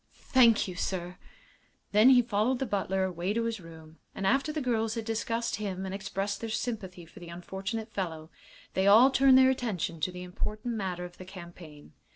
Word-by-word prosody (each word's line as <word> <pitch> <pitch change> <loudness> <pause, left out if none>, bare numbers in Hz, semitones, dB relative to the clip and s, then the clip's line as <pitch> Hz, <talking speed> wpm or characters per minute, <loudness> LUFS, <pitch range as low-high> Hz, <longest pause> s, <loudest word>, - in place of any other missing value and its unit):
"Thank 235 -5 +4
you, 185 - -5
sir." 180 -1 -3 0.7
Then 215 +5 +6
he 250 -2 +6
followed 230 +3 +1
the 265 - -2
butler 190 -3 -1
away 185 +1 -2
to 230 +1 0
his 230 -2 -2
room, 160 -2 -14 0.2
and 195 - -4
after 275 +8 +2
the 305 - -3
girls 225 -4 0
had 225 -1 -4
discussed 230 +1 -2
him 195 -3 -4
and 190 - -5
expressed 195 +1 -3
their 230 - -4
sympathy 205 -6 -4
for 185 +6 -15
the 175 -1 -10
unfortunate 195 +6 -5
fellow, 160 -4 -4 0.4
they 190 +1 +1
all 230 +7 +7
turned 265 0 +6
their 260 0 +6
attention 210 -10 -3
to 155 +4 -1
the 180 0 -8
important 215 +6 -4
matter 185 -5 -3
of 175 0 -12
the 185 - -9
campaign. 170 - -12
200 Hz, 190 wpm, -29 LUFS, 180-230 Hz, 0.7 s, all